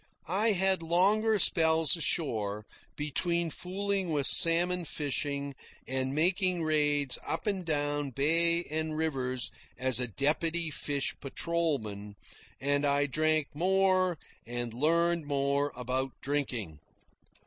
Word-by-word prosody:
I 205 Hz, +6 st, +1 dB
had 190 Hz, -1 st, +2 dB
longer 205 Hz, +6 st, +2 dB
spells 160 Hz, -5 st, +3 dB
ashore, 110 Hz, -, -2 dB, 0.3 s
between 170 Hz, +3 st, -2 dB
fooling 195 Hz, +1 st, -3 dB
with 145 Hz, -3 st, +1 dB
salmon 175 Hz, +2 st, +6 dB
fishing 140 Hz, -2 st, -3 dB, 0.3 s
and 130 Hz, +1 st, -2 dB
making 180 Hz, +2 st, +1 dB
raids 145 Hz, -3 st, +1 dB
up -, -, -4 dB
and 195 Hz, -3 st, -2 dB
down 145 Hz, -2 st, -1 dB
bay 165 Hz, +5 st, +3 dB
and 155 Hz, 0 st, -3 dB
rivers 130 Hz, -7 st, -2 dB, 0.3 s
as 130 Hz, -2 st, +1 dB
a 125 Hz, -, -1 dB
deputy 160 Hz, -, -1 dB
fish 140 Hz, -1 st, -2 dB
patrolman, 135 Hz, -, -3 dB, 0.4 s
and 145 Hz, +1 st, 0 dB
I 145 Hz, 0 st, +1 dB
drank 155 Hz, +1 st, 0 dB
more 185 Hz, +1 st, +1 dB, 0.3 s
and 120 Hz, 0 st, -5 dB
learned 165 Hz, +4 st, 0 dB
more 140 Hz, 0 st, -1 dB
about 130 Hz, +1 st, -3 dB
drinking. 125 Hz, -, -4 dB
155 Hz, 115 wpm, -29 LUFS, 140-170 Hz, 0.4 s, salmon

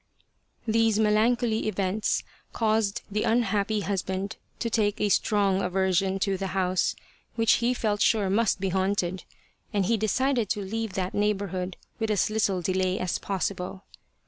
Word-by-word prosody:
These 225 Hz, -1 st, +3 dB
melancholy 220 Hz, +1 st, +2 dB
events 200 Hz, 0 st, 0 dB, 0.3 s
caused 215 Hz, -2 st, +1 dB
the 210 Hz, +1 st, 0 dB
unhappy 215 Hz, -2 st, +1 dB
husband 195 Hz, +1 st, -3 dB, 0.2 s
to 235 Hz, -, -2 dB
take 215 Hz, -2 st, +1 dB
a 210 Hz, -, +1 dB
strong 200 Hz, -1 st, +2 dB
aversion 190 Hz, +1 st, +1 dB
to 195 Hz, -1 st, +1 dB
the 195 Hz, +1 st, -3 dB
house, 185 Hz, -1 st, +1 dB, 0.4 s
which 225 Hz, -1 st, +4 dB
he 245 Hz, +2 st, +2 dB
felt 210 Hz, -3 st, -1 dB
sure 210 Hz, -3 st, +3 dB
must 205 Hz, +2 st, +2 dB
be 190 Hz, 0 st, -1 dB
haunted, 190 Hz, -1 st, -1 dB, 0.5 s
and 200 Hz, -3 st, +1 dB
he 230 Hz, +4 st, +2 dB
decided 235 Hz, +1 st, +1 dB
to 205 Hz, -, -1 dB
leave 225 Hz, 0 st, -3 dB
that 185 Hz, -1 st, -2 dB
neighbourhood 195 Hz, -3 st, -1 dB, 0.2 s
with 220 Hz, -1 st, -1 dB
as 210 Hz, 0 st, +1 dB
little 200 Hz, -4 st, +1 dB
delay 185 Hz, +1 st, 0 dB
as 185 Hz, -1 st, -2 dB
possible. 190 Hz, -1 st, -3 dB
205 Hz, 145 wpm, -27 LUFS, 190-220 Hz, 0.5 s, which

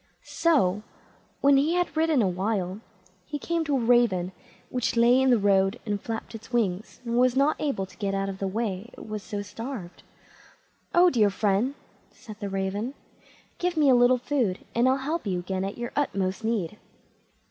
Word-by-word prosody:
So, 210 Hz, -, +2 dB, 0.6 s
when 280 Hz, 0 st, +6 dB
he 305 Hz, +5 st, +2 dB
had 355 Hz, -2 st, 0 dB
ridden 315 Hz, -6 st, +3 dB
a -, -, +2 dB
while, 190 Hz, +1 st, -2 dB, 0.5 s
he 295 Hz, -, -3 dB
came 335 Hz, +3 st, -1 dB
to 285 Hz, -2 st, +1 dB
a -, -, 0 dB
Raven, 230 Hz, -7 st, +3 dB, 0.4 s
which 250 Hz, -2 st, -1 dB
lay 240 Hz, +2 st, +5 dB
in 265 Hz, -, +3 dB
the 245 Hz, -, +5 dB
road 195 Hz, +1 st, +2 dB
and 205 Hz, -2 st, -2 dB
flapped 225 Hz, 0 st, -5 dB
its 225 Hz, +2 st, -10 dB
wings, 210 Hz, -5 st, -1 dB
and 235 Hz, +1 st, 0 dB
was 255 Hz, 0 st, +4 dB
not 280 Hz, +3 st, +3 dB
able 275 Hz, -10 st, -1 dB
to 185 Hz, -1 st, -18 dB
get 195 Hz, -1 st, -2 dB
out 195 Hz, 0 st, -1 dB
of 195 Hz, -1 st, -5 dB
the 195 Hz, -, -1 dB
way, 205 Hz, 0 st, -3 dB
it -, -, -11 dB
was 215 Hz, -1 st, -4 dB
so 205 Hz, +2 st, -5 dB
starved. 210 Hz, -3 st, -7 dB, 0.9 s
"Oh, 355 Hz, 0 st, +6 dB
dear 215 Hz, -7 st, +4 dB
friend", 205 Hz, +6 st, 0 dB, 0.3 s
said 215 Hz, -2 st, -12 dB
the 205 Hz, -, -4 dB
Raven, 195 Hz, +6 st, -2 dB, 0.6 s
"give 355 Hz, -1 st, -1 dB
me 290 Hz, -3 st, +5 dB
a -, -, +6 dB
little 245 Hz, +1 st, +5 dB
food, 245 Hz, -7 st, -1 dB
and 240 Hz, +2 st, +3 dB
I'll 260 Hz, -, +3 dB
help 295 Hz, 0 st, -3 dB
you 185 Hz, -2 st, 0 dB
again 185 Hz, +1 st, -3 dB
at 195 Hz, +1 st, -4 dB
your 240 Hz, 0 st, -4 dB
utmost 195 Hz, -7 st, -1 dB
need." 210 Hz, -4 st, -2 dB
225 Hz, 190 wpm, -26 LUFS, 195-265 Hz, 0.9 s, when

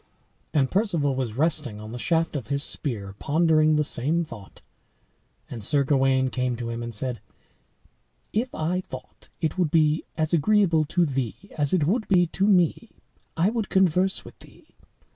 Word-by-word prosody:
And 135 Hz, -4 st, +1 dB
Perceval 175 Hz, -9 st, +1 dB
was 130 Hz, -4 st, -3 dB
resting 145 Hz, -5 st, -1 dB
on 110 Hz, +1 st, -9 dB
the 125 Hz, -, -6 dB
shaft 165 Hz, +3 st, 0 dB
of 130 Hz, -6 st, -4 dB
his 140 Hz, 0 st, -1 dB
spear, 105 Hz, -12 st, -3 dB
pondering 155 Hz, 0 st, +3 dB
the 150 Hz, -, +2 dB
same 150 Hz, +5 st, 0 dB
thought, 105 Hz, -10 st, -12 dB, 0.9 s
and 115 Hz, -3 st, -7 dB
Sir 140 Hz, +7 st, +2 dB
Gawain 135 Hz, -1 st, +2 dB
came 125 Hz, -1 st, -1 dB
to 115 Hz, 0 st, -5 dB
him, 115 Hz, 0 st, -4 dB
and 120 Hz, 0 st, -5 dB
said: 120 Hz, 0 st, -3 dB, 1.1 s
"If 235 Hz, +5 st, 0 dB
I 175 Hz, +4 st, -1 dB
thought 130 Hz, -7 st, -11 dB
it 160 Hz, +3 st, -1 dB
would 175 Hz, -4 st, +2 dB
be 155 Hz, 0 st, +2 dB
as 155 Hz, +1 st, -1 dB
agreeable 170 Hz, -1 st, +3 dB
to 175 Hz, +3 st, +1 dB
thee 135 Hz, -6 st, -2 dB, 0.2 s
as 145 Hz, -3 st, +1 dB
it 175 Hz, -6 st, +2 dB
would 215 Hz, +7 st, 0 dB
be 180 Hz, -3 st, +4 dB
to 190 Hz, +4 st, -1 dB
me, 190 Hz, +3 st, +2 dB, 0.5 s
I 180 Hz, +6 st, +3 dB
would 225 Hz, -3 st, -2 dB
converse 190 Hz, 0 st, +2 dB
with -, -, -13 dB
thee. -, -, -19 dB
155 Hz, 170 wpm, -25 LUFS, 130-175 Hz, 1.1 s, be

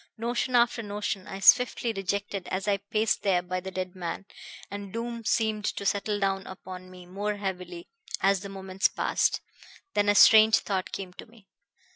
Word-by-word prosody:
Notion 240 Hz, +2 st, -1 dB
after 240 Hz, 0 st, +3 dB
notion 205 Hz, -2 st, -4 dB
I 195 Hz, -, -6 dB
swiftly 245 Hz, +1 st, +5 dB
rejected 195 Hz, -1 st, -3 dB
as 190 Hz, +2 st, -3 dB
I 200 Hz, -1 st, +3 dB
paced 215 Hz, +2 st, 0 dB
there 185 Hz, -3 st, +2 dB
by 185 Hz, +1 st, -3 dB
the 190 Hz, +1 st, -7 dB
dead 185 Hz, 0 st, -5 dB
man, 180 Hz, +2 st, -5 dB, 0.5 s
and 200 Hz, -1 st, -6 dB
doom 235 Hz, +1 st, -4 dB
seemed 220 Hz, -2 st, +1 dB
to 200 Hz, -, -3 dB
settle 205 Hz, +1 st, 0 dB
down 195 Hz, -1 st, -1 dB
upon 185 Hz, 0 st, -9 dB
me 180 Hz, -1 st, -12 dB
more 205 Hz, +3 st, -3 dB
heavily 180 Hz, -3 st, -5 dB, 0.3 s
as 195 Hz, 0 st, +3 dB
the 200 Hz, +1 st, -8 dB
moments 190 Hz, 0 st, 0 dB
passed. -, -, 0 dB, 0.5 s
Then 205 Hz, 0 st, +2 dB
a 205 Hz, -, +4 dB
strange 220 Hz, +1 st, +8 dB
thought 190 Hz, -2 st, -3 dB
came 185 Hz, -2 st, -6 dB
to -, -, -11 dB
me. 220 Hz, -3 st, -21 dB
200 Hz, 175 wpm, -27 LUFS, 185-215 Hz, 0.5 s, strange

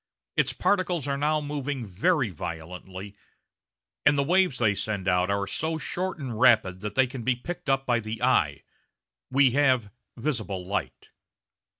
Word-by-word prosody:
Its -, -, +2 dB
particles 180 Hz, -7 st, 0 dB
are 140 Hz, -, 0 dB
now 150 Hz, +2 st, +1 dB
moving 145 Hz, -3 st, -3 dB
very 120 Hz, -, +1 dB
violently, 90 Hz, +5 st, -7 dB, 0.9 s
and 145 Hz, 0 st, +4 dB
the 140 Hz, -, +3 dB
waves 180 Hz, -2 st, +3 dB
they 110 Hz, -4 st, +3 dB
send 100 Hz, -2 st, -3 dB
out 90 Hz, 0 st, +2 dB
are 100 Hz, 0 st, 0 dB
so 160 Hz, +11 st, -2 dB
short 185 Hz, +4 st, -3 dB
and 125 Hz, -7 st, -5 dB
rapid 110 Hz, -8 st, +4 dB
that 105 Hz, +1 st, -5 dB
they 130 Hz, -, +5 dB
can 130 Hz, 0 st, -7 dB
be 125 Hz, +2 st, +1 dB
picked 155 Hz, +5 st, -6 dB
up 135 Hz, 0 st, +2 dB
by 120 Hz, -2 st, +2 dB
the 110 Hz, 0 st, -5 dB
eye 80 Hz, -, +2 dB, 0.7 s
we 135 Hz, -1 st, +4 dB
have 130 Hz, -6 st, +2 dB, 0.3 s
visible 110 Hz, -8 st, -3 dB
light. 100 Hz, +2 st, -4 dB
125 Hz, 160 wpm, -27 LUFS, 100-145 Hz, 0.9 s, they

